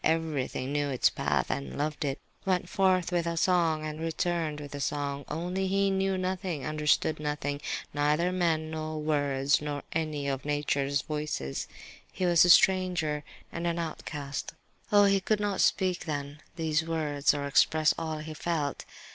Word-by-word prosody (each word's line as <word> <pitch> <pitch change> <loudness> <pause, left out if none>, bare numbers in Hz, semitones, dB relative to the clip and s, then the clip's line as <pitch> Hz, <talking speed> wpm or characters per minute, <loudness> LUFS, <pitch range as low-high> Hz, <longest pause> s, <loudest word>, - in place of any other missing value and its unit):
Everything 155 -5 0
knew 145 0 0
its 130 -3 +3
path - - 0
and 70 -2 -4
loved 150 +2 -2
it, 135 0 -2 0.2
went 185 -2 0
forth 185 -2 +2
with 170 -1 0
a 170 0 -2
song 165 -3 +2
and 155 0 -5
returned 165 -1 -1
with 145 -1 -8
a 145 - -5
song; 140 0 -2
only 180 +5 -2
he 195 +1 +2
knew 190 0 +1
nothing, 185 -6 -2
understood 155 0 +1
nothing, 150 -1 -2 0.3
neither 150 +5 +2
men 165 -3 0
nor 155 0 -4
words, 145 -2 +1
nor 145 -1 -4
any 155 -3 -2
of 135 -1 -2
nature's 145 -1 0
voices; 150 - -3 0.4
he 185 - -2
was 175 -2 +6
a 180 - +3
stranger 175 -5 +4 0.3
and 170 +1 -3
an 170 0 0
outcast. 150 -3 -5 0.4
Oh, 205 -1 +7
he 195 0 +4
could 215 +2 +1
not 205 0 0
then 195 - -4
speak 185 -2 +2 0.5
these 160 -1 +1
words, 155 -3 +1
or 140 -1 -2
express 155 +2 +4
all 160 -1 -3
he 155 +1 -6
felt! 155 -3 -2
155 Hz, 165 wpm, -29 LUFS, 145-175 Hz, 0.5 s, Oh